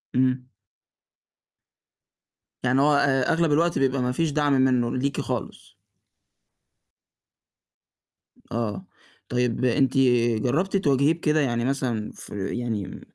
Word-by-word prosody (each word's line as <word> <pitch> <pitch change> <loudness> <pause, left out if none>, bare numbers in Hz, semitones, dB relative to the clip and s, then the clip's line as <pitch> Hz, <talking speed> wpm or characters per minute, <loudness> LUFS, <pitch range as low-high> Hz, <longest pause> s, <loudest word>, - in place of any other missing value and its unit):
إمم. 130 0 +1 2.2
يعني 130 +2 +2
هو 150 +1 +4
أ 135 -2 +2
أغلب 165 -2 +1
الوقت 165 +3 +2
بيبقى 135 -1 +1
ما 125 - 0
فيش 160 +4 -1
دعم 145 -1 +1
مِنّه 130 -2 +2
ليكِ 140 +1 -1
خالص. - - -6 2.8
آه، 115 - -3 0.4
طيب 125 0 0
أنتِ 135 +2 +2 0.5
جرّبتِ 175 +10 0
تواجهيه 145 -3 +2
بكده؟ 155 -2 0
يعني 120 -3 0
مثلًا 125 -5 -2
في 100 +2 -5
يعني، 110 -6 -4
130 Hz, 105 wpm, -24 LUFS, 125-145 Hz, 2.8 s, هو